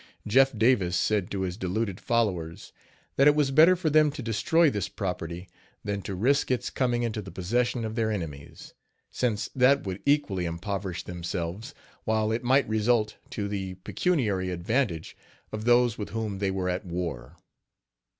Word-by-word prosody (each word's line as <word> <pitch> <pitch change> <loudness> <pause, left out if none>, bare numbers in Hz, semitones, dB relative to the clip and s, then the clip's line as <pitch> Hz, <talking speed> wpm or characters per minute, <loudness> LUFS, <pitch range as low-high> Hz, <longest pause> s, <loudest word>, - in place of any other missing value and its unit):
Jeff 130 +2 +4
Davis 100 -6 +3
said 100 -1 +1
to 100 - -3
his 90 -1 -3
deluded 100 0 -2
followers 95 -9 -1 0.4
that 140 - +6
it 150 - +6
was 145 -3 +2
better 160 +6 +7
for 170 -4 -1
them 155 0 +5
to 140 -3 -6
destroy 115 +10 +3
this 100 -7 -1
property 90 -2 -5 0.4
than 100 -1 -3
to 95 - -5
risk 135 +10 +2
its 125 -1 -1
coming 120 -2 0
into 110 -2 -2
the 95 - -9
possession 120 +6 -1
of 110 - -4
their 110 -1 0
enemies, 80 -9 -6 0.4
since 110 -4 -1
that 135 +1 +4
would 95 0 -4
equally 140 -11 +1
impoverish 90 +2 -4
themselves, 90 - -5 0.3
while 110 -1 +1
it 115 +2 -1
might 130 +3 +3
result 110 0 +1
to 100 -2 -3
the 95 -2 -4
pecuniary 105 - 0
advantage 90 - -1 0.4
of 110 0 -5
those 120 -1 +3
with 105 - -4
whom 110 -3 -3
they 100 -1 0
were 95 -1 -2
at 90 +2 -1
war. 85 -6 -5
105 Hz, 165 wpm, -27 LUFS, 95-125 Hz, 0.4 s, better